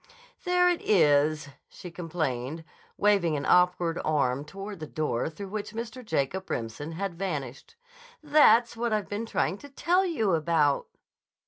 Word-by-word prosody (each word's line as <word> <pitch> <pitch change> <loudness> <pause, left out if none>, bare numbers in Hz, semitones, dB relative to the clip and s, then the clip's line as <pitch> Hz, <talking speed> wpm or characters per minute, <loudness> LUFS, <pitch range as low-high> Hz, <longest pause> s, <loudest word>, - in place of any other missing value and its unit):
"There 360 0 +3
it 355 -1 +1
is," 150 -5 +3 0.2
she 180 - -10
complained, 160 -4 -3 0.3
waving 195 -7 +2
an 140 - -4
awkward 180 -2 +3
arm 140 -3 0
toward 195 +4 -8
the 155 - -6
door 150 -4 -2
through 190 +5 -8
which 210 +1 -5
Mr. 235 +2 -6
Jacob 185 - -2
Remsen 120 +8 -4
had 195 +2 -3
vanished. 150 - -5 0.5
"That's 245 -6 +5
what 235 -1 -1
I've 210 -1 -1
been 215 +3 -4
trying 200 -2 -1
to 285 - -12
tell 350 +7 +1
you 280 - 0
about." 155 -3 +1
180 Hz, 145 wpm, -27 LUFS, 150-215 Hz, 0.5 s, That's